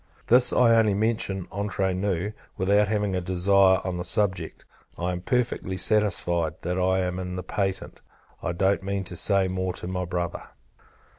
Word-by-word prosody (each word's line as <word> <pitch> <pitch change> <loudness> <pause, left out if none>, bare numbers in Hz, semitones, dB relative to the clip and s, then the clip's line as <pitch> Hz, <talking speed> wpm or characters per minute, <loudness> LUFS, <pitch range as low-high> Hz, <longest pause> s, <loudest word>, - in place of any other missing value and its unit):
This 125 +1 +6
I 120 -2 +4
only 110 -3 +3
mention 100 -3 -1
entre 100 -1 -1
nous, 95 +1 -2 0.2
without 100 +2 +3
having 105 -2 -1
a 90 - -1
desire 95 +1 +3
on 90 -1 -2
the 90 - -3
subject. 100 +1 -1 0.3
I 90 +1 -2
am 90 0 -4
perfectly 120 -5 -1
satisfied, 90 -5 +1
that 90 +2 -2
I 95 +1 +2
am 90 0 -2
in 90 -1 -5
the 90 - -5
patent. 95 +1 -3 0.4
I - - -2
don't 95 +3 +1
mean 100 0 -3
to 90 -1 -7
say 100 +2 +2
more 95 0 -2
to - - -8
my 90 0 -3
Brother. 85 0 -4
95 Hz, 170 wpm, -25 LUFS, 90-100 Hz, 0.4 s, This